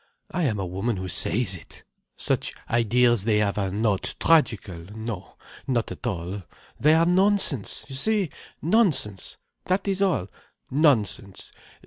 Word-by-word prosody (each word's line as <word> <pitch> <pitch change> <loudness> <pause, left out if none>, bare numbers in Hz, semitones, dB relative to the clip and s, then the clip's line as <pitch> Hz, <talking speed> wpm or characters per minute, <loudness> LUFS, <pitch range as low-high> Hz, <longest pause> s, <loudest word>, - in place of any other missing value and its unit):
I 175 -2 0
am 110 -7 0
a 95 - -2
woman 95 +5 -2
who 95 0 -4
says 95 +3 0
it. 90 - -12 0.3
Such - - -1
ideas 120 -1 +3
they 105 -1 +2
have 105 -1 +1
are 95 -1 0
not 100 0 0
tragical. 105 - +2
No, 110 -5 -6 0.3
not 120 -3 0
at - - -6
all. 90 +2 -3 0.4
They 155 +3 +5
are 165 +1 +4
nonsense, 185 - +2
you 135 - -9
see, 200 +5 +1 0.3
nonsense. 160 - +1 0.3
That 185 +2 0
is 195 0 0
all. 180 - +1 0.4
Nonsense. 120 - +1
115 Hz, 140 wpm, -25 LUFS, 100-160 Hz, 0.4 s, They